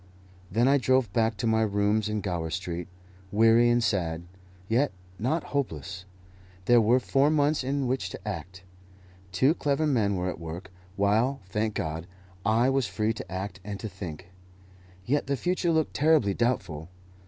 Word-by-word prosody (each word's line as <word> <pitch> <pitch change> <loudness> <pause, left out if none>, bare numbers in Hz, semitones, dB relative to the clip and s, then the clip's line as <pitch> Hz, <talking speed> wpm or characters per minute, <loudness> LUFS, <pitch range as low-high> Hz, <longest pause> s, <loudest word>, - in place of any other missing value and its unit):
Then 120 +3 +2
I 140 +1 +5
drove 130 -6 +2
back 115 -1 +1
to 120 - -2
my 110 0 +3
rooms 105 0 +1
in 105 -1 -1
Gower 85 -5 -2
Street, 90 0 -4 0.4
weary 115 +3 +5
and 120 0 +3
sad, 85 -7 0 0.4
yet 125 +7 +2 0.3
not 145 +9 0
hopeless. 90 - -3 0.6
There 120 -1 +6
were 120 +4 +4
four 135 +3 +2
months 150 -1 +2
in 135 +1 -1
which 130 +1 -1
to - - -9
act. 95 -1 -6 0.7
Two 130 - +3
clever 150 -1 0
men 110 -9 +2
were 90 0 -1
at 90 - -4
work, 85 +3 -7 0.2
while, 110 +7 +2
thank 105 +3 -2
God, 80 +2 -3 0.4
I 110 +4 +3
was 135 -3 +1
free 105 +4 0
to 110 - -9
act 95 0 -4
and 100 0 -6
to 110 - -4
think. 90 -4 -8 0.7
Yet 145 +2 0
the 140 0 0
future 180 +3 0
looked 160 -2 +1
terribly 150 -9 +3
doubtful. 90 -9 -1
110 Hz, 165 wpm, -27 LUFS, 95-130 Hz, 0.7 s, There